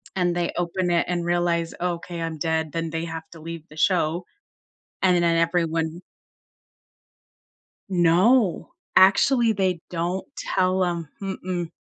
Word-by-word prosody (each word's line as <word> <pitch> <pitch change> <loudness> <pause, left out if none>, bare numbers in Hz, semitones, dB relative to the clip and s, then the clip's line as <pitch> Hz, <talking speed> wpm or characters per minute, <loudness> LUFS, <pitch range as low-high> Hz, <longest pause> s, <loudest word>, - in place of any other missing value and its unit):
And 175 -2 +1
they 175 -1 0
open 175 +1 -1
it 170 - +2
and 175 -1 -1
realize, 175 -1 0
okay, 170 -1 -3
I'm 165 -1 -3
dead, 160 -1 -1
then 165 -1 -2
they 165 0 -3
have 160 -1 -6
to 165 - -12
leave 165 -1 -7
the 155 - -14
show, 175 -1 +1 0.8
and 180 -1 +4
then 170 -1 +2
everyone 165 0 0 1.9
No, 185 - +3 0.2
actually, 225 +5 +5
they 185 -4 0
don't 175 +2 -2
tell 185 0 +1
'em, 170 -3 -3
mm-mm. 185 -3 -3
175 Hz, 130 wpm, -24 LUFS, 165-185 Hz, 1.9 s, actually